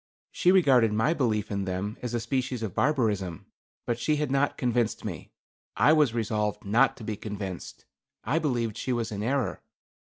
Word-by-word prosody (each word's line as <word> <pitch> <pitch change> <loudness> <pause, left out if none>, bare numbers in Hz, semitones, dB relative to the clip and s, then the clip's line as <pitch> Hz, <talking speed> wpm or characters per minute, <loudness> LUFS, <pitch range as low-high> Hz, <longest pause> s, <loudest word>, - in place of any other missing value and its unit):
She 180 - +3
regarded 135 - +5
my 110 +9 +2
belief 110 -9 0
in 100 -1 -1
them 95 +3 -3
as 120 -1 -3
a - - +1
species 125 0 -2
of 105 -5 -3
barbarism. 105 - 0 0.4
But 120 0 -1
she 150 +5 +1
had 150 -2 -1
not 140 +1 +1
convinced 120 -4 0
me. - - -6 0.5
I 150 - +5
was 150 -7 +3
resolved 105 -3 -1
not 115 +7 +3
to - - -10
be 110 0 -3
convinced. 100 -4 -7 0.4
I 145 +8 +1
believed 120 -8 -1
she 130 - -2
was 115 -2 -2
in 100 -1 -4
error. 125 -2 -1
115 Hz, 180 wpm, -27 LUFS, 105-135 Hz, 0.5 s, regarded